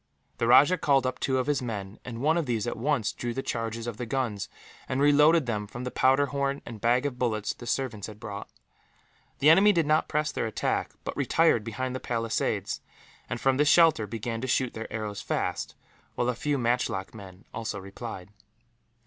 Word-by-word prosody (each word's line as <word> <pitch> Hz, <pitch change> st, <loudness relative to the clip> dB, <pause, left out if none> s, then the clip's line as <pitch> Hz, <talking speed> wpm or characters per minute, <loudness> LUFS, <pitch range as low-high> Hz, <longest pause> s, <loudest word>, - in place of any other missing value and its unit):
The 115 Hz, -, +1 dB
rajah 145 Hz, +9 st, +6 dB
called 135 Hz, -3 st, +3 dB
up 130 Hz, 0 st, -2 dB
two 130 Hz, -1 st, 0 dB
of 130 Hz, -, 0 dB
his 145 Hz, -2 st, 0 dB
men, 105 Hz, -4 st, -5 dB
and 120 Hz, -2 st, -7 dB
one 155 Hz, +2 st, +3 dB
of 170 Hz, -4 st, 0 dB
these 115 Hz, -3 st, 0 dB
at 120 Hz, -, -2 dB
once 125 Hz, -2 st, 0 dB
drew 120 Hz, -1 st, -4 dB
the 135 Hz, -, -2 dB
charges 115 Hz, 0 st, -3 dB
of 120 Hz, -3 st, -5 dB
the 120 Hz, -, -5 dB
guns, 115 Hz, -5 st, -2 dB, 0.4 s
and 130 Hz, -, -1 dB
reloaded 150 Hz, +2 st, +5 dB
them 105 Hz, -3 st, -2 dB
from 120 Hz, +4 st, -7 dB
the 125 Hz, -, -4 dB
powder 135 Hz, +2 st, +3 dB
horn 140 Hz, 0 st, -2 dB
and 115 Hz, -3 st, -9 dB
bag 125 Hz, +3 st, +2 dB
of 130 Hz, -3 st, -3 dB
bullets 110 Hz, -4 st, 0 dB
the 120 Hz, -, -11 dB
servants 120 Hz, -7 st, -2 dB
had 105 Hz, -1 st, -11 dB
brought. 105 Hz, -3 st, -7 dB, 0.9 s
The 150 Hz, +3 st, +6 dB
enemy 195 Hz, +5 st, +7 dB
did 170 Hz, -5 st, +2 dB
not 155 Hz, +1 st, +2 dB
press 150 Hz, -1 st, 0 dB
their -, -, -2 dB
attack, 110 Hz, -, -1 dB
but -, -, -4 dB
retired 160 Hz, -9 st, +3 dB
behind 125 Hz, +4 st, -3 dB
the -, -, -3 dB
palisades 115 Hz, -2 st, -2 dB, 0.5 s
and, 120 Hz, -, -3 dB
from 135 Hz, +1 st, +2 dB
this 150 Hz, +1 st, +3 dB
shelter, 160 Hz, -10 st, +5 dB
began 115 Hz, +1 st, -4 dB
to 130 Hz, -, -3 dB
shoot 130 Hz, 0 st, +1 dB
their 110 Hz, 0 st, -7 dB
arrows 105 Hz, -2 st, -4 dB
fast, -, -, -2 dB, 0.4 s
while 120 Hz, -, 0 dB
a -, -, +1 dB
few 145 Hz, +4 st, -1 dB
matchlock 120 Hz, -6 st, -1 dB
men 100 Hz, -2 st, -12 dB
also 110 Hz, -2 st, -4 dB
replied. 100 Hz, 0 st, -8 dB
120 Hz, 200 wpm, -27 LUFS, 110-140 Hz, 0.9 s, enemy